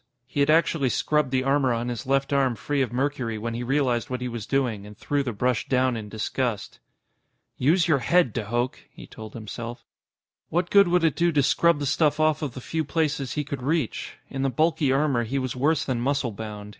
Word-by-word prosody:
He 130 +3 -5
had 140 +1 +3
actually 155 -3 +3
scrubbed 150 +2 +1
the 130 0 0
armor 135 -1 +2
on 115 +1 -1
his 120 +2 -5
left 135 +1 +1
arm 135 -3 +2
free 145 +5 -1
of 130 - -1
mercury 125 -3 -1
when 115 +2 -4
he 120 - -4
realized 125 -2 0
what 125 -1 -3
he 125 - -3
was 115 -4 -6
doing 125 -7 0
and 105 0 -12
threw 145 -1 -1
the 130 -3 -2
brush 125 +1 -1
down 130 -1 +2
in 110 -2 -6
disgust. 110 +1 -3 0.8
"Use 165 +7 +3
your 155 -5 +3
head, 170 - +2
de 105 - -3
Hooch!" 120 +3 -2
he - - -12
told 110 -1 -11
himself. 115 +2 -7 0.6
What 175 +2 -1
good 200 -1 +6
would 175 0 +2
it 160 -3 +2
do 170 0 +2
to 145 -3 +2
scrub 170 +4 +3
the 145 - -3
stuff 150 +2 +2
off 155 0 +2
of 145 -6 -4
the 130 - -6
few 160 +5 -2
places 150 -3 -1
he 150 - -1
could 140 -2 -6
reach? 150 -1 -2
In 135 - -5
the 135 - +1
bulky 155 +1 +1
armor, 135 -3 +2
he 125 +5 -3
was 130 -2 -2
worse 155 +4 +1
than 125 -3 -1
muscle 135 -1 0
bound. 105 -1 -7
135 Hz, 220 wpm, -25 LUFS, 120-150 Hz, 0.8 s, good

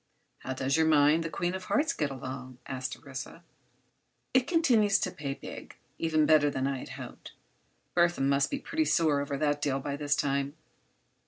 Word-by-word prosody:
"How 130 - -4
does 130 +3 0
your 160 0 +3
mine, 150 +1 +5
the 165 - -3
Queen 175 +2 -2
of 190 -1 -5
Hearts, 300 +2 +1
get 150 -2 -1
along?" 130 -1 -7
asked 130 -1 -4
Orissa. 135 +4 -8 0.9
"It 260 -1 +3
continues 235 - +4
to - - -1
pay 140 -2 -4
big—even 155 -2 -3
better 150 -1 +5
than 135 -2 -2
I 135 -1 -1
had - - -9
hoped. - - -9 0.6
Burthon 175 -6 +3
must 140 0 +2
be 280 - -2
pretty 315 +3 -1
sore 155 - +3
over 140 0 -3
that 145 0 0
deal 135 -2 0
by 140 +1 -3
this 145 0 0
time. 140 +1 -1
145 Hz, 175 wpm, -29 LUFS, 135-170 Hz, 0.9 s, mine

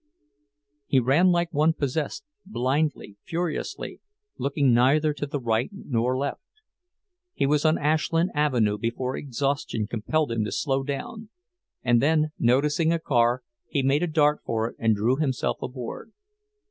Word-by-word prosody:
He 135 - +4
ran 140 +9 +4
like 170 -1 +1
one 155 +2 +3
possessed, 150 - -2 0.2
blindly, 140 - -1
furiously, 170 -1 -4 0.4
looking 140 -2 +2
neither 145 +6 +3
to 145 0 -4
the 145 0 -3
right 115 0 0
nor 130 - -1
left. 140 +1 -3 0.9
He - - +1
was 150 +2 +2
on 155 +1 +4
Ashland 160 +3 +1
Avenue 120 -9 +1
before 125 +3 -2
exhaustion 135 -4 -2
compelled 120 +7 -1
him 115 -2 0
to 105 - -3
slow 135 -2 0
down, 175 +11 -5 0.5
and 120 -2 +3
then, 155 +1 +2
noticing 145 +6 +2
a 170 - +2
car, 125 -5 +1 0.2
he 140 - -1
made 135 +3 +2
a 175 - +1
dart 150 -2 +2
for 115 0 -1
it - - -21
and 110 -1 +3
drew 115 +6 +1
himself 140 -4 -1
aboard. 125 - -6
140 Hz, 145 wpm, -25 LUFS, 120-155 Hz, 0.9 s, He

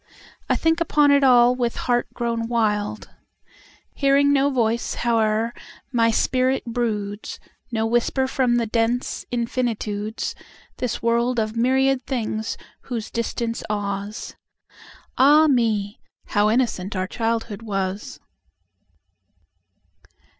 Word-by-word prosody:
I - - +3
think 325 +1 +1
upon 295 -3 +4
it 280 0 +4
all 245 -2 +6
with 245 -2 -1
heart 240 -1 0
grown 230 -1 -2
wild. 210 -3 -1 0.8
Hearing 280 0 +3
no 280 0 +3
voice, 235 -3 0
howe'er 225 -1 +1 0.4
my 230 -2 +3
spirit 255 +3 +1
broods, 220 -4 -3 0.3
No 225 -1 0
whisper 240 +3 +1
from 260 -2 +1
the 235 -1 +1
dense 230 +2 -1
infinitudes, 230 -3 -2 0.4
This 245 -2 -3
world 235 +2 +1
of 215 0 -2
myriad 265 +2 +2
things 220 -4 -2 0.3
whose 230 -4 -5
distance 230 0 -2
awes. 205 0 -4 0.8
Ah 295 +4 +7
me; 225 -7 +1 0.3
how 205 0 +3
innocent 215 -5 0
our 185 0 0
childhood 225 0 -2
was! 195 -2 -4
235 Hz, 110 wpm, -23 LUFS, 215-255 Hz, 0.8 s, Ah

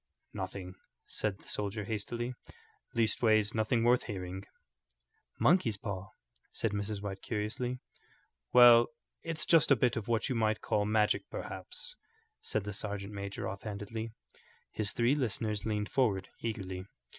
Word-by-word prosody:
"Nothing," 95 -1 -5 0.3
said 105 -3 -1
the - - -20
soldier, 105 +1 -2
hastily. 120 +3 -2 0.6
"Leastways 110 -1 +3
nothing 115 +1 +2
worth 120 +1 +4
hearing." 95 -2 -5 1.0
"Monkey's 140 - +4
paw?" 95 -2 -5 0.4
said 115 - -1
Mrs. 100 0 -3
White, 95 -1 -4
curiously. 115 +3 -2 0.7
"Well, 120 -1 +9 0.3
it's 165 -1 -2
just 165 -3 +5
a 140 - +8
bit 125 0 +2
of 110 - -3
what 115 -2 +1
you 135 - 0
might 110 -2 +1
call 105 -1 +1
magic, 105 0 +2
perhaps," - - -6 0.5
said 110 - -1
the 105 0 -4
sergeant 100 0 -4
major, 100 0 -4
offhandedly. 105 +3 -5 0.6
His 105 -2 -1
three 120 +3 +3
listeners 110 -6 -1
leaned 105 -1 -1
forward 100 -8 +1
eagerly. 95 -5 -4
110 Hz, 135 wpm, -32 LUFS, 100-115 Hz, 1.0 s, Well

